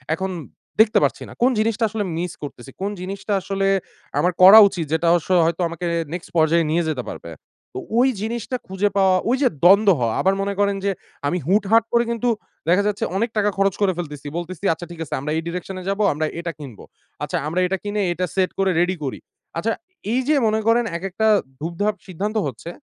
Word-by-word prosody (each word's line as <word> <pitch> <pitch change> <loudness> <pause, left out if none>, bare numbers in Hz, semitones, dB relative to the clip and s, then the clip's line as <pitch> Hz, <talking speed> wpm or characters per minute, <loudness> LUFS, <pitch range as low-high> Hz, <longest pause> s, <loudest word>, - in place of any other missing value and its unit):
এখন 190 +3 -3 0.5
দেখতে 220 0 +5
পারছি - - 0
না। - - -12
কোন 255 - +5
জিনিসটা 225 +1 0
আসলে 215 0 -2
মিস 175 0 -3
করতেছি। 135 -2 -8
কোন 200 +1 -1
জিনিসটা 200 +2 -4
আসলে 195 +1 -1 0.5
আমার 180 - +2
করা 195 +4 +11
উচিত 180 -5 -3
যেটা 160 +1 +1
অবশ্য 175 -1 0 0.2
হয়তো 165 +2 -1
আমাকে 170 +1 -6 0.3
next 175 -1 -6
পর্যায়ে 165 +1 +3
নিয়ে 170 +2 +2
যেতে 135 -5 -2
পারবে। 85 - -8 0.4
তো - - -4 0.2
ওই 260 +2 +5
জিনিসটা 235 +3 -3
খুঁজে 190 +2 0
পাওয়া, 190 -1 +4
ঐযে 260 +2 +3 0.2
দ্বন্দ্ব 200 +4 +7
হওয়া। 115 -2 0
আবার 190 - +3
মনে 200 0 -1
করেন 200 0 +2
যে 200 - +2 0.4
আমি 175 - 0
হুটহাট 205 +4 +4
করে 235 0 +4
কিন্তু 235 +1 0 0.4
দেখা 185 +4 +4
যাচ্ছে 205 -1 -2
অনেক 230 +4 0
টাকা 210 0 +3
খরচ 195 -1 +2
করে 195 -2 +3
ফেলতেছি। 150 -4 -6
বলতেছি 175 +2 -6
আচ্ছা 160 +2 -8
ঠিক 170 - -10
আছে - - -8
আমরা 145 +3 -4
এই - - 0
direction 180 +2 -5
এ - - -9
যাবো, 200 +2 0
আমরা 155 +2 -1
এটা 170 0 -3
কিনবো। 130 -8 -10 0.4
আচ্ছা, - - -2
আমরা 165 +4 -1
এটা 190 +1 -1
কিনে 205 0 -2
এটা 180 +2 -1
সেট 190 -1 +2
করে 195 -1 +3
রেডি 180 +2 +1
করি। 135 - -4 0.4
আচ্ছা, 215 +7 0 0.4
এইযে 260 +5 +2
মনে 215 0 +1
করেন 235 +1 +4
এক 170 - -12
একটা 220 +4 0 0.3
ধুপ-ধাপ 175 +7 -1
সিদ্ধান্ত 200 +5 -3
হচ্ছে। 135 +5 -7
190 Hz, 200 wpm, -21 LUFS, 170-210 Hz, 0.5 s, করা